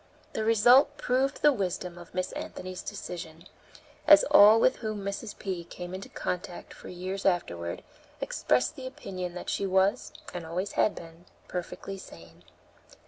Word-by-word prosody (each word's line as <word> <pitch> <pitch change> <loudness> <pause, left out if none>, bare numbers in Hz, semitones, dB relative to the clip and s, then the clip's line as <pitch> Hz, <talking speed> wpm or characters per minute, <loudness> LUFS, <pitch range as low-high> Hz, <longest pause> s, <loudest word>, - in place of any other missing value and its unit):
The 220 - -1
result 245 +6 +5
proved 265 +3 0
the 295 -1 +7
wisdom 180 -4 -3
of 175 0 -13
Miss 185 0 -1
Anthony's 185 0 -6
decision, 165 -2 -7 0.6
as - - +9
all 215 +2 +9
with 255 +3 +3
whom 215 -3 -4
Mrs. 200 +2 -5
P. 185 -3 -4
came 175 +1 -8
in 190 - -5
contact 180 -2 -5
for - - -11
years 185 +2 -5
afterward, 85 - -1 0.4
expressed 125 0 0
the 260 -1 -7
opinion 185 -8 -6
that 180 - -7
she 195 - -1
was, 190 +5 +2 0.2
and 175 - -5
always 180 +5 -3
had 210 - +2
been, 165 +1 -12 0.2
perfectly 185 +2 -6
sane. 85 - -14
185 Hz, 150 wpm, -28 LUFS, 175-215 Hz, 0.6 s, as